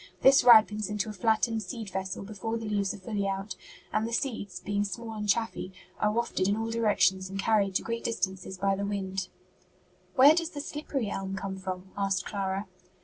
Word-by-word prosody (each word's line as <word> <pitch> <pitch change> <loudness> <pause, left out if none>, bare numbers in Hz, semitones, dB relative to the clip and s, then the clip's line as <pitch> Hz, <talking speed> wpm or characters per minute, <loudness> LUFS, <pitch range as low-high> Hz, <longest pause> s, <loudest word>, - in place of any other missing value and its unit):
This 270 +1 +7
ripens 215 -3 +6
into 210 0 -2
a - - -5
flattened 220 +2 +1
seed 215 +1 -6
vessel 190 0 -3
before 215 +2 -4
the 225 - -6
leaves 200 -2 0
are - - -7
fully 200 0 -2
out, 195 +1 -3 0.4
and 215 +1 +1
the - - -5
seeds, 225 -7 -2
being 205 0 -1
small 225 +2 -5
and 210 -1 -4
chaffy, 225 -3 0 0.3
are 210 - +2
wafted 225 -4 0
in 200 +1 +1
all 225 0 -2
directions 205 -4 +2
and 195 - -5
carried 200 -2 +2
to - - +1
great 230 0 -3
distances 190 -3 -2
by 195 +1 +1
the 200 - -3
wind." 195 -1 -2 0.9
"Where 280 +2 +8
does 335 0 -1
slippery 285 -6 -3
elm 195 0 -3
come 190 0 -4
from?" 185 0 -6
asked 195 -2 0
Clara. 195 0 -2
205 Hz, 190 wpm, -29 LUFS, 195-225 Hz, 0.9 s, Where